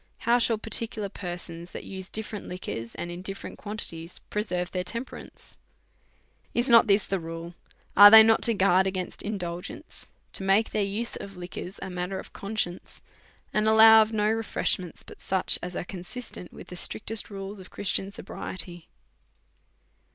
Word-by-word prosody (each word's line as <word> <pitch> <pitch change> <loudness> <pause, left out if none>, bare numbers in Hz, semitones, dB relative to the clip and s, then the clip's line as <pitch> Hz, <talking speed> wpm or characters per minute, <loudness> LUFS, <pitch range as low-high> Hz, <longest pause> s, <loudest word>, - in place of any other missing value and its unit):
How 240 +1 +3
shall 230 -1 +2
particular 220 -1 -3
persons, 175 -2 -7
that - - -6
use 190 -1 -7
different 215 -1 -4
liquors, 115 -10 -5
and 175 - -5
in 175 +1 -6
different 195 +1 -7
quantities, 180 -5 -4
preserve 185 -4 -1
their 180 -1 -1
temperance? 230 +7 -6 1.0
Is 240 +2 +3
not 230 -1 +7
this 200 0 +4
the 195 - -1
rule? 165 +1 -7 0.4
Are 205 0 +12
they 220 +1 +11
not 225 0 +4
to 230 - +2
guard 190 -1 +4
against 185 -1 -3
indulgence, 180 -4 -6 0.2
to - - -2
make 195 +3 +3
their 215 - 0
use 205 +4 -2
of 195 -2 -9
liquors 180 +2 -7
a 190 - -5
matter 180 +2 -3
of - - -9
conscience, 200 -3 -4 0.5
and 215 0 +2
to 220 - +5
allow 220 0 +9
of 215 0 +1
no 210 -1 +1
refreshments 215 -5 -1
but - - -14
such 190 -1 +1
as 180 0 -6
are - - -2
consistent 180 +1 -7
with - - -12
the 180 - -7
strictest 215 +4 -2
rules 195 0 -7
of 185 - -12
Christian 195 0 -2
pobriety 175 -3 -6
195 Hz, 165 wpm, -27 LUFS, 180-215 Hz, 1.0 s, Are